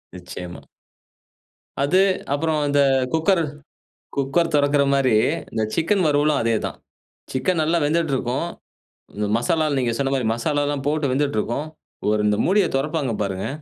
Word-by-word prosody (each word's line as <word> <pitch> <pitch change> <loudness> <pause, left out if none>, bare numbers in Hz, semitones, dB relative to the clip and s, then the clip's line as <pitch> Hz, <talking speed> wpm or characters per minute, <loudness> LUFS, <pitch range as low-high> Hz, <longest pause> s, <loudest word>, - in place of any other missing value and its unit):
நிச்சயமா. 90 0 -8 1.2
அது 185 +7 +3 0.3
அப்புறம் 155 +1 0
அந்த 145 0 +2 0.3
குக்கர் 170 +2 +2 0.7
குக்கர் 140 +5 +1
தொறக்குற 145 0 +3
மாதிரி, 130 -4 +3 0.4
இந்த 110 - -1
சிக்கன் 185 +4 +1
வறுவலும் 145 0 +2
அதேதான். 115 -1 -1 0.5
சிக்கன் 160 +7 0
நல்லா 160 +2 +2
வெந்துட்டு 160 -1 +1
இருக்கும். 130 +6 -2 0.7
இந்த 105 0 -1
மசாலால 150 +4 0
நீங்க 120 -3 0
சொன்ன 135 -1 0
மாதிரி 125 -4 0
மசாலாலாம் 145 +2 -1
போட்டு 150 -2 0
வெந்துட்டு 140 -4 0
இருக்கும். 140 +8 -2 0.4
ஒரு, 105 0 +2
இந்த 105 0 +2
மூடிய 195 +1 +3
தொறப்பாங்க 145 -2 -1
பாருங்க. 95 -1 -2
145 Hz, 130 wpm, -22 LUFS, 120-160 Hz, 1.2 s, அது